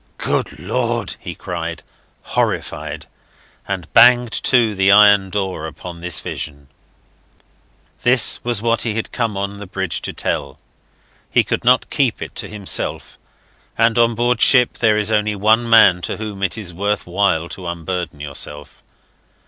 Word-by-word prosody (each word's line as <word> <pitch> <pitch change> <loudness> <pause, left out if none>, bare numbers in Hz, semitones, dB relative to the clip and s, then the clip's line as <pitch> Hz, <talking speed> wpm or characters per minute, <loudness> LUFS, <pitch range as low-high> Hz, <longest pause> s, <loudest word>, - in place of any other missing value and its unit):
"Good - - -2
Lord!" - - -2
he - - -8
cried, - - -6 0.4
horrified, - - -3 0.6
and 95 -5 -5
banged 120 0 +6
to 120 -4 +3
the 95 0 +3
iron 100 -1 +6
door 95 -5 -3
upon 85 +2 -10
this 90 -2 -1
vision. 70 -3 -6 1.3
This 125 -1 +4
was 120 -3 -1
what 115 -1 +1
he 110 -3 -1
had 115 - -4
come 115 -5 -2
on 100 +1 -4
the 105 - -9
bridge 95 -3 -3
to - - -4
tell. - - -4 0.7
He - - +3
could - - -3
not 125 +1 +3
keep 130 -6 0
it - - -7
to - - -2
himself; 105 -3 -3 0.6
and 115 0 +2
on 115 -1 +3
board 120 +1 0
ship 125 -3 +5
there 110 -2 +2
is 105 +1 -1
only 105 -1 +1
one 110 +4 +2
man 100 -6 +6
to - - -3
whom 105 -3 -7
it 95 0 -1
is 95 -5 -7
worth 100 +4 -2
while 90 -2 0
to 90 -2 -8
unburden 85 -2 -5
yourself. 75 0 -6
105 Hz, 155 wpm, -18 LUFS, 90-115 Hz, 1.3 s, banged